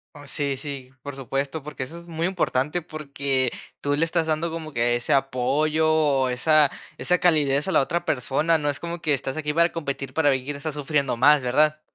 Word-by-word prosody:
Oh. 145 Hz, 0 st, -12 dB
Sí, 140 Hz, -1 st, -2 dB
sí, 135 Hz, -3 st, -7 dB
por 145 Hz, -1 st, -6 dB
supuesto, 135 Hz, +3 st, -3 dB
porque 145 Hz, -3 st, -6 dB
eso 165 Hz, +6 st, -9 dB
es 170 Hz, -, -15 dB
muy 165 Hz, +1 st, -2 dB
importante, 170 Hz, -3 st, 0 dB
porque 140 Hz, -4 st, -1 dB, 0.3 s
tú 145 Hz, 0 st, 0 dB
le 155 Hz, -, +1 dB
estás 165 Hz, -1 st, 0 dB
dando 160 Hz, +1 st, -1 dB
como 160 Hz, -2 st, -6 dB
que 120 Hz, 0 st, +2 dB
ese 120 Hz, -, 0 dB
apoyo, 140 Hz, +4 st, +1 dB
o 140 Hz, -4 st, +2 dB
esa 150 Hz, +3 st, +3 dB, 0.3 s
esa 180 Hz, 0 st, +1 dB
calidez 150 Hz, -3 st, +2 dB
a -, -, 0 dB
la -, -, +4 dB
otra 170 Hz, +5 st, -1 dB
persona, 150 Hz, +5 st, +1 dB
no 145 Hz, -1 st, -1 dB
es 145 Hz, -, -3 dB
como 170 Hz, 0 st, -5 dB
que 155 Hz, -3 st, +1 dB
estás 135 Hz, +1 st, -3 dB
aquí 150 Hz, -1 st, -2 dB
para 170 Hz, +1 st, +3 dB
competir, 140 Hz, -4 st, -4 dB
para 155 Hz, -3 st, +3 dB
ver 130 Hz, -2 st, +1 dB
quién 145 Hz, +1 st, -4 dB
está 155 Hz, +2 st, -4 dB
sufriendo 140 Hz, -3 st, -1 dB
más, 145 Hz, +3 st, +6 dB
¿verdad? 150 Hz, +5 st, +2 dB
145 Hz, 210 wpm, -24 LUFS, 135-160 Hz, 0.3 s, más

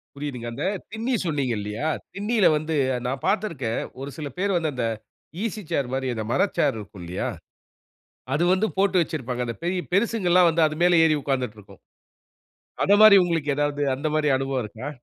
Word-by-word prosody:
புரியுதுங்க. 135 Hz, -5 st, -5 dB
அந்த 145 Hz, -, -4 dB, 0.3 s
திண்ணி 230 Hz, +3 st, -1 dB
சொன்னீங்க 140 Hz, -7 st, 0 dB
இல்லீயா? 105 Hz, +7 st, -4 dB, 0.3 s
திண்ணியில 205 Hz, +1 st, +1 dB
வந்து 155 Hz, +1 st, -2 dB, 0.3 s
நான் 130 Hz, +1 st, -3 dB
பார்த்திருக்கேன். 165 Hz, -, -1 dB, 0.2 s
ஒரு 140 Hz, +1 st, -5 dB
சில 150 Hz, -2 st, -4 dB
பேர் 195 Hz, 0 st, +1 dB
வந்து, 160 Hz, -3 st, 0 dB
அந்த 125 Hz, -2 st, -1 dB, 0.6 s
ஈசி 220 Hz, -1 st, -3 dB
சேர் 130 Hz, -3 st, -1 dB
மாரி 130 Hz, 0 st, -1 dB
அந்த 110 Hz, -1 st, -4 dB
மர -, -, +3 dB, 0.2 s
சேர் -, -, +2 dB
இருக்கு 100 Hz, -2 st, -10 dB
இல்லியா? 85 Hz, +2 st, -3 dB, 1.1 s
அது 165 Hz, -, +2 dB
வந்து 190 Hz, +4 st, +2 dB
போட்டு 195 Hz, -1 st, +2 dB
வச்சிருப்பாங்க. 125 Hz, -6 st, -4 dB
அந்த 115 Hz, -1 st, -4 dB
பெரிய 180 Hz, +1 st, 0 dB
பெரிசுங்கள்லாம் 185 Hz, -5 st, +3 dB
வந்து, 165 Hz, 0 st, +1 dB
அது 155 Hz, -, -6 dB
மேல 175 Hz, -2 st, +5 dB
ஏறி 155 Hz, -, +3 dB
உட்கார்ந்துட்ருக்கும். 110 Hz, -8 st, -4 dB, 1.1 s
அத 200 Hz, -, +4 dB
மாரி, 215 Hz, -2 st, +10 dB
உங்களுக்கு 165 Hz, -4 st, 0 dB
எதாவது 145 Hz, 0 st, 0 dB
அந்த 145 Hz, +4 st, -3 dB
மாரி 150 Hz, -1 st, +2 dB
அனுபவம் 135 Hz, -1 st, -2 dB
இருக்கா? 115 Hz, +6 st, -7 dB
150 Hz, 170 wpm, -24 LUFS, 125-180 Hz, 1.1 s, மாரி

